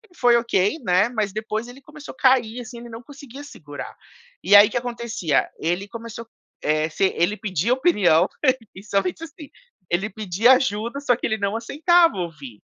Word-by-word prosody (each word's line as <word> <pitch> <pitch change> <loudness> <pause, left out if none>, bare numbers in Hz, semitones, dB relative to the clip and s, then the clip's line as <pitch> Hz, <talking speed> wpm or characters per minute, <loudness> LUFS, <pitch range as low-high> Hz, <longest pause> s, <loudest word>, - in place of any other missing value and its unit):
foi 240 -4 +4
okay, 230 - 0
né? 205 - +2
Mas 215 -4 -2
depois 215 +2 -4
ele 250 +3 -13
começou 305 +1 -12
cair, 250 -3 +2
assim, 240 0 -10
ele 240 0 -11
não 230 +1 -10
conseguia 280 0 -12
segurar. 145 - -10 0.5
E 195 +4 +5
aí, 205 +1 +9
o - - -10
que - - -1
acontecia? 235 - -1
Ele 175 +5 -2
começou, 230 +1 -9 0.4
eh, 155 +1 0
se 165 - 0
ele 195 +5 +1
pedia 200 +3 -1
opinião 200 - +3 0.5
e 190 - -11
somente 200 - -2
assim 310 -2 -11 0.4
ele 190 +5 -1
pedia 215 +4 +3
ajuda, 245 0 -1
só 250 -4 +2
que - - -5
ele 220 -1 -1
não 200 +1 -2
aceitava 330 - +2
ouvir. 150 - -7
225 Hz, 175 wpm, -22 LUFS, 190-250 Hz, 0.5 s, aí